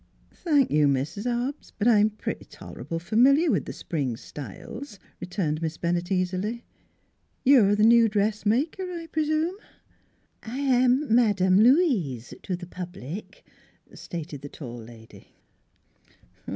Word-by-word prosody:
" - - -35
Thank 290 -6 +3
you, 150 -1 +4
Mis' 140 - -1
Hobbs, 245 +4 -3
but 215 - +1
I'm 215 -2 +5
pretty 215 - -6
tor - - -12
able 165 - -4
f'miliar 265 - +3
with - - 0
th' - - -6
spring 135 -8 -3
styles," 200 - -9 0.2
returned 170 -4 -2
Miss 160 -1 -3
Bennett 175 +1 -2
easily. 190 +5 -1 0.4
" - - -44
You're 235 -7 +6
th' 210 +1 +4
new 230 0 +6
dressmaker, 215 - 0
I 355 -3 -5
p'rsume? 310 +4 0 0.3
" - - -38
" - - -43
I 230 +3 -7
am 255 -1 +2
Madame 200 -5 +4
Louise 215 - +2
to 185 - -3
the 175 0 -8
public," 180 - -8 0.5
stated 155 -4 -7
the 145 - -8
tall 120 -6 -8
lady. 115 -1 -14
210 Hz, 140 wpm, -26 LUFS, 170-255 Hz, 0.5 s, You're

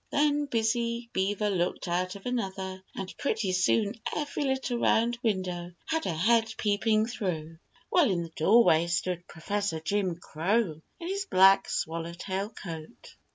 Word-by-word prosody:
Then 295 0 +2
Busy 235 0 0
Beaver 205 +2 0
looked 180 -1 -1
out 180 +2 -1
of 200 - -11
another, 190 -6 -3
and 190 -1 -6
pretty 215 -8 0
soon 200 +3 +2 0.2
every 295 -1 -2
little 265 -2 -1
round 235 +1 +2
window 180 -5 -2
had 320 0 -1
a 175 - 0
head 225 +6 +3
peeping 215 +1 +2
through, 165 -9 -4 0.3
while 340 -8 +5
in 175 -3 0
the 165 - -7
doorway 170 -2 +5
stood 175 +1 -1
Professor 200 +1 -2
Jim 185 +2 0
Crow 170 +1 -1 0.2
in 335 - -6
his 390 +1 -2
black 195 +1 +6
swallowtail 170 +5 -3
coat. 165 -7 -9
200 Hz, 145 wpm, -28 LUFS, 175-235 Hz, 0.3 s, black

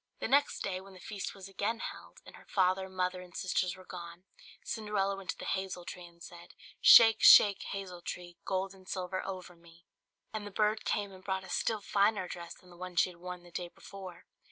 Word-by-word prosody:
The - - -2
next 285 +4 +2
day, 185 -1 -2
when 195 0 -14
the - - -13
feast 200 +1 -6
was 195 -1 -9
again 205 +4 -2
held, - - -8
and - - -12
her - - -17
father, 190 0 +2
mother, 185 0 -2
and 180 -2 -11
sisters 180 0 0
were 185 0 -14
gone, 170 0 -9 0.4
Cinderella 210 -3 -1
went 195 -1 -11
to - - -2
the - - -7
hazel 190 -2 -3
tree, 180 -1 -8
and 170 0 -17
said 170 -1 -12 0.3
"Shake, 225 -2 +9
shake, 200 -2 +9
hazel 185 -3 -6
tree, 175 0 -7
Gold 190 0 -2
and 190 -1 -16
silver 185 0 -3
over 185 -2 -7
me!" 170 0 -20 0.5
And 210 -1 -4
the - - -6
bird 215 +2 0
came 205 -1 -1
and 185 -1 -13
brought 190 -1 -2
a - - -11
still 220 -2 0
finer 200 -1 +2
dress 170 -1 -7
than 180 - -19
the 175 - -15
one 180 0 -7
she 180 - +3
had 175 - -17
worn 180 0 -7
the 175 - -15
day 175 +1 -4
before. 185 -1 -11
185 Hz, 220 wpm, -32 LUFS, 180-195 Hz, 0.5 s, Shake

